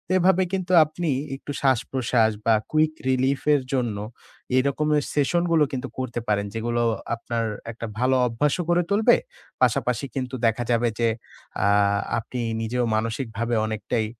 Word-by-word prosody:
এভাবে 185 0 +4
কিন্তু 185 -1 -2
আপনি 160 +2 -4 0.3
একটু 140 - -8
শ্বাসপ্রশ্বাস 125 -3 +2
বা 115 - +5 0.2
Quick 155 0 +2 0.2
Relief 130 +1 +1
এর 145 - +3
জন্য, 120 -5 0 0.6
এরকমের 145 +2 +1
সেশন 150 +4 +2
গুলো 160 -2 +5
কিন্তু 135 0 -3
করতে 120 -2 -3
পারেন। 100 -1 +1
যেগুলো 120 +1 -1 0.3
আপনার 115 0 -3 0.3
একটা 115 0 -7
ভালো 130 +1 +3
অভ্যাস 125 +5 0
ও - - -2
করে 175 0 +4
তুলবে। 220 +4 +5 0.5
পাশাপাশি 125 +1 +1
কিন্তু 130 -1 -3
দেখা 115 +2 0
যাবে 120 0 +2
যে, 115 -1 +3 0.6
আ - - +4 0.5
আপনি 125 +3 -6 0.2
নিজেও 120 +2 -1
মানসিকভাবে 115 +1 -2
অনেকটাই 110 +1 -2
125 Hz, 145 wpm, -24 LUFS, 115-150 Hz, 0.6 s, বা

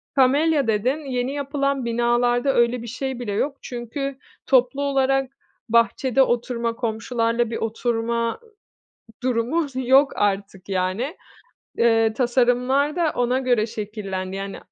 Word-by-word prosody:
Kamelya 280 +1 +3
dedin, 225 +6 +1
yeni 250 +2 -1
yapılan 280 -2 -1
binalarda 240 +2 +2
öyle 235 0 +2
bir 235 - -8
şey 260 +2 -4
bile 230 -4 -4
yok, 275 +7 -1
çünkü 260 +3 -5 0.3
toplu 260 +1 +3
olarak 270 -1 +1 0.4
bahçede 235 +3 +3
oturma, 235 -2 0
komşularla 230 0 -1
bir 230 - -3
oturma 230 - -1 0.8
durumu 255 +6 0
s 260 -1 -5
yok 265 +3 +4
artık 195 -1 -1
yani. 190 - -1 0.6
Eee, 225 -1 +3
tasarımlar 250 +4 +2
da 335 -3 +1
ona 245 +1 +1
göre 245 -4 +2
şekillendi, 200 -4 -5
yani 195 0 -5
245 Hz, 120 wpm, -23 LUFS, 230-270 Hz, 0.8 s, yok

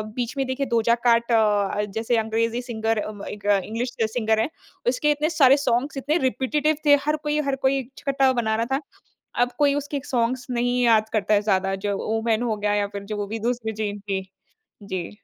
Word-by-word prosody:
बीच 245 +2 -3
में 270 - +1
देखिए 260 +2 -1
Doja 235 +1 +3
cat 235 0 +3
अ, 210 -2 +2
जैसे 225 +3 0
अंग्रेज़ी 225 +2 0
सिंगर 225 -2 -2 0.3
एक 205 -1 -9 0.2
इंग्लिश 235 +3 -4
सिंगर 220 0 +1
है, 225 - +1 0.4
उसके 280 +4 +2
इतने 300 +1 0
सारे 280 -4 +5
सॉन्ग्स 255 +4 +1
इतने 295 +4 +1
रिपेटिटिव 300 +4 0
थे। 290 -1 +7
हर 300 +1 +2
कोई, 300 0 0
हर 275 -2 -1
कोई 275 +1 +2
एक 260 0 -8
छठा 275 -1 +2
बना 220 -1 0
रहा 230 +1 0
था। - - -6 0.6
अब 245 0 +2
कोई 285 -1 +3
उसके 285 0 -3
सॉन्ग्स 245 +1 0
नहीं 245 +1 +1
याद 220 -2 +4
करता 215 -1 +1
है 205 - +4
ज़्यादा 195 -2 +1
जो 200 -1 0 0.2
ओमान 225 0 0
हो - - 0
गया 205 0 0
या 205 -1 +1
फ़िर 200 0 -7
जो - - -3
वो 205 -1 -3
भी 225 - -2
दूसरी 225 -3 -3
चीज़ 205 -1 -3
थी। 195 -2 -3 0.6
जी। 185 -4 -4
235 Hz, 200 wpm, -24 LUFS, 215-265 Hz, 0.6 s, थे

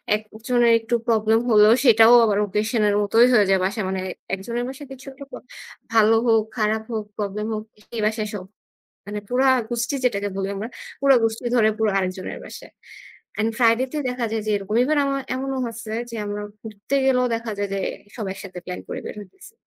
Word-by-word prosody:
একজনের 230 +3 0
একটু 225 +1 -1
প্রব্লেম 220 0 +3
হলেও 215 0 +6
সেটাও 225 0 +7
আবার 205 -2 +1
occasion 215 +3 -1
এর 205 - +1
মতই 225 +4 +5
হয়ে 210 -4 +5
যায় 190 -1 +4
বাসা 205 +4 -2
মানে 190 -1 -2 0.3
একজনের 235 +5 -4
বাসায় 270 +1 -9
কিছু 265 0 -11
একটা 280 +1 -11 0.7
ভালো 225 0 +5
হোক, 225 -1 +4
খারাপ 220 0 0
হোক, 215 -2 -3
প্রব্লেম 210 +1 -3
হোক, 215 0 -4 0.2
সেই 230 -2 -5
বাসায় 215 0 -1
সব। 185 -3 -6 0.6
মানে 205 0 -5
পুরা 260 +2 +2 0.2
গুষ্টি 240 +3 -2
যেটাকে 205 -4 0
বলি 195 0 -2
আমরা, 210 +3 -4 0.3
পুরা 275 -1 +6
গুষ্টি 225 +2 -1
ধরে 220 -2 +4
পুরো 220 -1 +1
আরেকজনের 185 -1 -3
বাসায়। - - -11 0.7
এন্ড 220 +1 +2
friday 230 +2 +4
তে - - -2
দেখা 250 -1 -2
যায় 220 -1 -1
যে - - +1
এরকম 200 +2 -4
ইভেন 300 +3 +1
আমার 275 0 -1
এমনও 270 0 -3
হয়েছে 230 -1 -7 0.2
যে - - -6
আমরা 205 0 -4 0.2
ঘুরতে 220 +4 -5
গেলেও 250 -1 +3
দেখা 230 -1 -5
যায় 200 -1 -2
যে 195 - -1 0.3
e - - -23
সব 215 - -4
একসাথে 190 -2 -9
প্ল্যান 180 - -5
করে - - -5
বের - - -7
হইতেছি। 375 - -15
220 Hz, 190 wpm, -22 LUFS, 210-240 Hz, 0.7 s, সেটাও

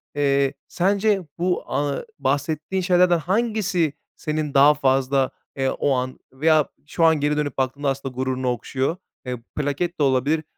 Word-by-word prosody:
Eee, 140 -1 +2
sence 200 +3 +2 0.2
bu, 180 +1 0
a 145 - -1 0.2
bahsettiğin 155 +6 -1
şeylerden 180 -1 +4
hangisi 190 -3 0 0.2
senin 155 -2 -3
daha 140 +2 +7
fazla, 135 -1 +1 0.2
eee, 135 -1 0
o 140 - 0
an 130 0 -3
veya 155 +2 +3 0.2
şu 165 - -1
an 160 -2 +4
geri 150 +1 +1
dönüp 145 -3 -2
baktığında 135 +2 0
aslında 135 -1 -3
gururunu 130 0 -2
okşuyor? 130 +6 -2 0.3
Eee, 125 0 -2 0.2
plaket 150 +4 -2
de - - +3
olabilir, 140 +4 +2
145 Hz, 145 wpm, -23 LUFS, 135-170 Hz, 0.3 s, daha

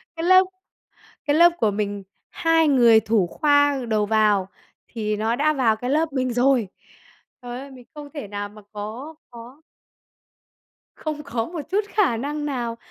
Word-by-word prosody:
cái 330 - -5
lớp 370 +1 +7 0.8
cái 290 0 +2
lớp 340 +2 +7
của 215 -2 +2
mình 205 -1 -3 0.3
hai 330 -2 +2
người 235 -5 +6
thủ 220 -4 +1
khoa 285 - +2
đầu 215 -1 +1
vào 210 -3 +2 0.4
thì 215 -2 -3
nó 225 +2 0
đã 305 +3 +2
vào 240 -6 +2
cái 245 +3 -4
lớp 310 +1 0
mình 255 -2 -1
rồi! 245 -3 +2 0.7
Trời 245 0 -7
ơi! 275 0 -10
Mình 250 -2 -14
không 295 -1 -9
thể 290 -9 -6
nào 205 0 -5
mà 210 +1 -15
có 230 +10 -7 0.2
có 240 +5 -13 1.4
không 305 -1 -5
có 230 -4 -3
một 340 -2 -6
chút 410 +2 +1
khả 405 - +1
năng 295 +5 -4
nào 240 -4 -3
250 Hz, 165 wpm, -23 LUFS, 220-295 Hz, 1.4 s, lớp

